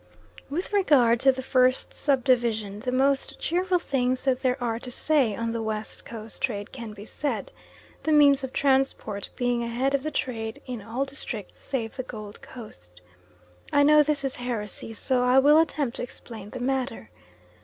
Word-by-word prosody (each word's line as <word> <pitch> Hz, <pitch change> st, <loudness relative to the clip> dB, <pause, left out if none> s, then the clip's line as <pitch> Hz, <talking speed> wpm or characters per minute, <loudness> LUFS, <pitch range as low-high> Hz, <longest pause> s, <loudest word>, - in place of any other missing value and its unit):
With 350 Hz, +8 st, -4 dB
regard 260 Hz, -, +4 dB
to 270 Hz, +2 st, +6 dB
the 260 Hz, 0 st, -6 dB
first 255 Hz, 0 st, +2 dB
sub 275 Hz, -4 st, +1 dB
division 225 Hz, -6 st, +1 dB
the 250 Hz, +3 st, -3 dB
most 270 Hz, +1 st, +1 dB
cheerful 360 Hz, +2 st, +1 dB
things 255 Hz, -5 st, -1 dB
that 260 Hz, -1 st, +1 dB
there 255 Hz, -1 st, +1 dB
are 230 Hz, -2 st, -1 dB
to 250 Hz, -, -7 dB
say 260 Hz, -4 st, +1 dB
on 230 Hz, +1 st, -2 dB
the 230 Hz, 0 st, -2 dB
West 220 Hz, -1 st, -3 dB
Coast 225 Hz, -2 st, -8 dB
trade 205 Hz, -5 st, -2 dB
can 235 Hz, -4 st, -7 dB
be 205 Hz, 0 st, -10 dB
said; 290 Hz, +5 st, -3 dB, 0.5 s
the 315 Hz, -, -1 dB
means 285 Hz, -2 st, +6 dB
of 265 Hz, -, -4 dB
transport 265 Hz, -8 st, 0 dB
being 245 Hz, -1 st, 0 dB
ahead 240 Hz, +4 st, -1 dB
of 280 Hz, -, +2 dB
the 310 Hz, -, -3 dB
trade 225 Hz, -6 st, -3 dB
in 245 Hz, -4 st, -5 dB
all 230 Hz, +6 st, -2 dB
districts 255 Hz, -7 st, -6 dB
save 235 Hz, -4 st, -4 dB
the -, -, -1 dB
Gold 215 Hz, -4 st, -9 dB
Coast. 90 Hz, -, -11 dB, 0.7 s
I 285 Hz, -, +5 dB
know 300 Hz, +1 st, +7 dB
this 295 Hz, -1 st, +1 dB
is 270 Hz, -1 st, -1 dB
heresy, 230 Hz, -3 st, -4 dB
so 250 Hz, +3 st, +1 dB
I 250 Hz, +1 st, +4 dB
will 295 Hz, +3 st, +7 dB
attempt 290 Hz, -6 st, 0 dB
to -, -, -4 dB
explain 225 Hz, -4 st, -8 dB
the 255 Hz, -, -7 dB
matter. 255 Hz, -, -2 dB
255 Hz, 180 wpm, -26 LUFS, 225-275 Hz, 0.7 s, know